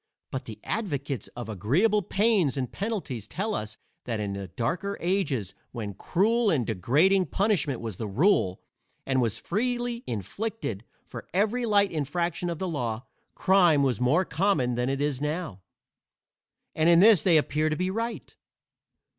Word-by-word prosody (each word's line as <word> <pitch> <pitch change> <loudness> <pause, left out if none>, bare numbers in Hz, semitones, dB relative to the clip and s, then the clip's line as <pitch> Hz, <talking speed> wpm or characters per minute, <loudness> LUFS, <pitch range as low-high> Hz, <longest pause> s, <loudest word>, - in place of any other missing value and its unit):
But 130 - -4
the 110 - -9
advocates 145 - -3
of 120 -2 -6
agreeable 145 - +2
pains 195 - +2
and 130 -3 -2
penalties 190 - -4
tell 210 +6 -3
us 110 - -4 0.3
that 115 -3 -2
in 100 -2 -2
the 100 -1 -5
darker 170 - -2
ages, 150 - -1 0.2
when 105 -4 -5
cruel 220 - +1
and 135 - +1
degrading 150 - +2
punishment 160 - 0
was 110 -6 -6
the 110 - -4
rule, 105 - +2 0.4
and 130 -1 +1
was 115 -4 0
freely 240 +3 -2
inflicted 120 - -4 0.2
for 125 - -9
every 225 +5 +1
light 205 -2 +3
infraction 170 +3 -2
of 170 - -3
the 185 - -3
law, 120 -7 -3 0.3
crime 175 -7 +4
was 125 -5 0
more 155 +10 +3
common 155 -7 +1
than 125 +2 -1
it 135 +1 -1
is 145 -2 -1
now; 150 - -3 1.1
and 160 +1 +3
in 170 0 +7
this 205 -3 +7
they 170 -1 +5
appear 155 +1 +1
to 155 - 0
be 185 +3 -1
right. 225 - -4
155 Hz, 155 wpm, -27 LUFS, 120-195 Hz, 1.1 s, in